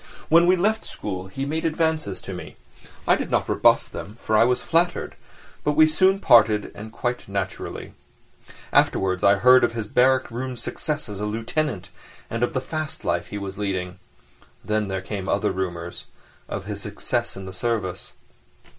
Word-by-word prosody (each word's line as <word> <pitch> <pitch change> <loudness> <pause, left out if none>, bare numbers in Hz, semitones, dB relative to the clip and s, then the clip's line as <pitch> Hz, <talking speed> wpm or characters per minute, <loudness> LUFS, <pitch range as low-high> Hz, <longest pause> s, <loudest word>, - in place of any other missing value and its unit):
When 170 +2 +6
we 185 - +6
left 215 +5 +1
school 95 -2 -6
he 135 +9 -4
made 155 +3 -2
advances 160 - 0
to - - -7
me; - - -8 0.5
I - - +6
did - - -4
not - - +1
rebuff - - +4
them, 105 +4 -8
for 110 - +1
I 110 - +6
was 125 0 +2
flattered, 170 +1 0 0.5
but 150 - +1
we 155 +1 +7
soon 185 +5 +3
parted 110 - +5
and 110 +1 -9
quite 120 +1 -3
naturally. 100 -1 -4 0.8
Afterwards 95 -1 +2
I 100 0 +6
heard 125 +5 +6
of - - +2
his 115 -2 -3
barrack 130 +3 +3
room 125 +1 -4
success 150 +4 -3
as 105 -2 -6
a 105 - -2
lieutenant, 115 - -2 0.4
and 115 - -2
of 120 - +1
the 130 - 0
fast 155 +2 -5
life - - 0
he 105 - -6
was 100 0 -6
leading. 95 -3 -3 0.7
Then 105 -1 0
there 95 -1 -3
came 95 -1 -5
other - - +1
rumours—of 85 -2 -7
his - - -5
successes - - -3
in 95 - -7
the 95 - -8
service. 100 -5 -3
115 Hz, 170 wpm, -24 LUFS, 95-150 Hz, 0.8 s, we